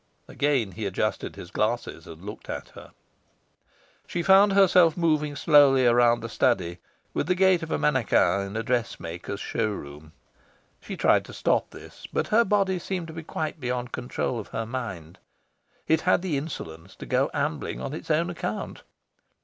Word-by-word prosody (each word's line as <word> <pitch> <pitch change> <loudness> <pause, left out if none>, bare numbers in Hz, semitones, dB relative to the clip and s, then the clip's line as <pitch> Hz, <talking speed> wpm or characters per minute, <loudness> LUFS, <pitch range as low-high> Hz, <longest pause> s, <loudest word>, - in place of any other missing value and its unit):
Again 135 -8 0
he 100 +3 -4
adjusted 100 +2 -2
his 85 - -10
glasses, 115 +3 -2
and 80 +2 -11
looked 105 - -9
at - - -5
her. - - -14 1.1
She 175 - -2
found 195 +2 +6
herself 180 -4 +5
moving 155 -3 +1
slowly 140 -4 +5
around 120 0 +4
the 115 - -4
study, 95 -8 0 0.3
with - - -1
the 180 - +2
gait 190 -1 +4
of - - -6
a 75 - 0
mannequin 75 +6 +2
in 100 +3 -6
a 115 - -2
dress 120 -1 -1
maker's 85 +4 -6
show 110 0 -1
room. 75 -5 -8 0.7
She - - -7
tried - - +3
to - - -11
stop - - +1
this; - - -12
but - - -1
her 230 +2 +5
body 195 -3 +1
seemed 175 -2 -4
to - - -8
be 165 - -6
quite 155 0 -4
beyond 125 -1 -3
control 120 -1 -3
of 105 - -7
her 115 - -4
mind. 95 -9 -6 0.7
It 160 0 +3
had 180 0 +2
the 175 -6 -1
insolence 95 - -6
to - - -9
go 130 +2 +1
ambling 145 0 -2
on 140 - -5
its 160 - -8
own 165 +3 +1
account. 110 -10 -5
130 Hz, 175 wpm, -26 LUFS, 105-165 Hz, 1.1 s, found